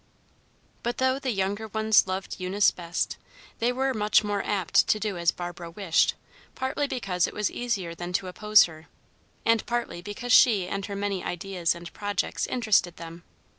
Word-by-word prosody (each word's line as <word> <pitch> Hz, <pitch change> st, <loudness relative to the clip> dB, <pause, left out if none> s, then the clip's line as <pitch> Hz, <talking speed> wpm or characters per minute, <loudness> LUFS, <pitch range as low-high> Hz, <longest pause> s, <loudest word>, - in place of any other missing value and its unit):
But 240 Hz, -, -2 dB
though 260 Hz, +1 st, +1 dB
the 270 Hz, -, -3 dB
younger 205 Hz, 0 st, -1 dB
ones 220 Hz, -1 st, +3 dB
loved 190 Hz, +1 st, -4 dB
Eunice 190 Hz, +3 st, +3 dB
best, 175 Hz, 0 st, -3 dB, 0.4 s
they 235 Hz, +2 st, +2 dB
were 265 Hz, +1 st, 0 dB
much 210 Hz, -1 st, +3 dB
more 205 Hz, -1 st, -1 dB
apt 195 Hz, -5 st, +2 dB
to 215 Hz, -, +2 dB
do 210 Hz, -2 st, -2 dB
as 170 Hz, -1 st, +1 dB
Barbara 175 Hz, -1 st, -5 dB
wished, 170 Hz, -1 st, +1 dB, 0.4 s
partly 265 Hz, +2 st, -1 dB
because 190 Hz, -10 st, -1 dB
it -, -, -9 dB
was 210 Hz, -1 st, 0 dB
easier 210 Hz, -9 st, -2 dB
than 175 Hz, +1 st, -6 dB
to 185 Hz, -, 0 dB
oppose 210 Hz, +3 st, +5 dB
her, 160 Hz, -2 st, -8 dB, 0.6 s
and 230 Hz, -1 st, +3 dB
partly 240 Hz, -7 st, -2 dB
because 205 Hz, +6 st, -5 dB
she 205 Hz, -7 st, +6 dB
and 195 Hz, +1 st, -4 dB
her 200 Hz, -, -5 dB
many 200 Hz, -2 st, -2 dB
ideas 180 Hz, -1 st, -1 dB
and 170 Hz, 0 st, -10 dB
projects 205 Hz, -1 st, -2 dB
interested 215 Hz, -7 st, +1 dB
them. 165 Hz, +1 st, -9 dB
200 Hz, 170 wpm, -26 LUFS, 180-220 Hz, 0.6 s, she